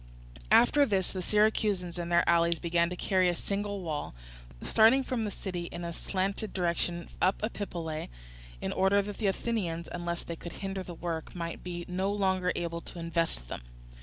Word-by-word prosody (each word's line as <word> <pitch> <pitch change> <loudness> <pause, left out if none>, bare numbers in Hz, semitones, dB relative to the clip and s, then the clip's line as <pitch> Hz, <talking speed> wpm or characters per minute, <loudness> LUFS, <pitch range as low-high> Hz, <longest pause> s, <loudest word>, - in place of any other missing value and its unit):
After 285 +4 +6
this 195 -8 +1
the 185 - -2
Syracusans 205 -3 +2
and 170 0 -3
their 170 - +4
allies 170 0 +4
began 170 0 +2
to 180 - -4
carry 185 0 +3
a 175 - 0
single 200 +2 -2
wall, 155 - -3 0.5
starting 230 +5 +6
from 250 -4 -1
the - - -1
city, 180 -3 -4
in 170 0 -6
a 170 - -3
slanting 195 +4 -2
direction 175 -1 -1
up 185 +2 +3
Epipolae, 170 -8 -3 0.5
in - - -2
order 195 +2 +4
that 205 0 -6
the 215 - +1
Athenians, 190 -5 -1
unless 175 -1 -3
they 170 - -5
could 170 +1 -8
hinder 195 -1 -4
the 180 -2 -7
work, 165 -1 -4
might 170 -1 -4
be 175 -1 -5
no 185 +2 0
longer 190 -3 +1
able 170 -1 -2
to - - -10
invest 165 - -1
them. - - -5
180 Hz, 180 wpm, -30 LUFS, 170-200 Hz, 0.5 s, After